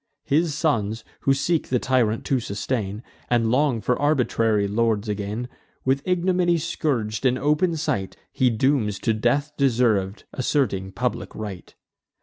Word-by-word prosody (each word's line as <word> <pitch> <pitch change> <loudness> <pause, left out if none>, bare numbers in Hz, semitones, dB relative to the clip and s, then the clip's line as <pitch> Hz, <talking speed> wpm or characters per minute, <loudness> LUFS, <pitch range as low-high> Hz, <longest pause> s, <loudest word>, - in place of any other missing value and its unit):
His 155 +1 +1
sons, 115 -8 0 0.2
who 135 - +3
seek 160 +4 0
the 125 - +1
tyrant 120 -4 +1
to 135 - +1
sustain, 105 -1 -3 0.3
And 115 -2 +2
long 130 -3 +2
for 125 +4 0
arbitrary 115 -8 +2
lords 110 0 0
again, 105 +3 -3 0.4
With 135 +1 +2
ignominy 180 -1 +2
scourg'd, 120 -9 -2
in 130 -1 +3
open 150 +5 +1
sight, 100 - -2
He 130 - +2
dooms 115 -3 +1
to 115 - 0
death 120 +7 +1
deserv'd, 115 -7 +1
asserting 120 -8 0
public 120 +6 -3
right. 100 -5 -7
125 Hz, 135 wpm, -24 LUFS, 105-145 Hz, 0.4 s, who